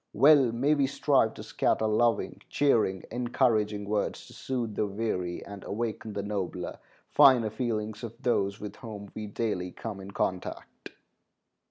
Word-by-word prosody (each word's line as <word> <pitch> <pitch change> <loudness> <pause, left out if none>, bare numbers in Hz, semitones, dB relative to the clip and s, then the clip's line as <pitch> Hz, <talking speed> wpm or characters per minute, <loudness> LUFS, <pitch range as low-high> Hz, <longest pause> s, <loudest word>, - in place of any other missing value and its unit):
Well 135 0 +6
may 135 +6 +2
we 140 -2 +2
strive 135 -5 +2
to - - -8
scatter 110 - +1
loving, 110 +1 +1
cheering, 110 -10 +2
encouraging 110 -4 +1
words, 105 0 -1
to - - -14
soothe 120 -4 -3
the 105 - 0
weary, 95 -4 -3
and 100 -1 -9
awaken 110 0 -4
the 100 - -3
nobler, 95 -3 -4 0.3
finer 130 -7 +6
feelings 110 -2 -3
of 115 0 -7
those 100 -5 0
with 105 - -7
whom 105 -4 -8
we 110 -1 -5
daily 100 -4 -2
come 105 0 -6
in 95 0 -9
contact. 95 -2 -4
110 Hz, 150 wpm, -29 LUFS, 100-120 Hz, 0.3 s, Well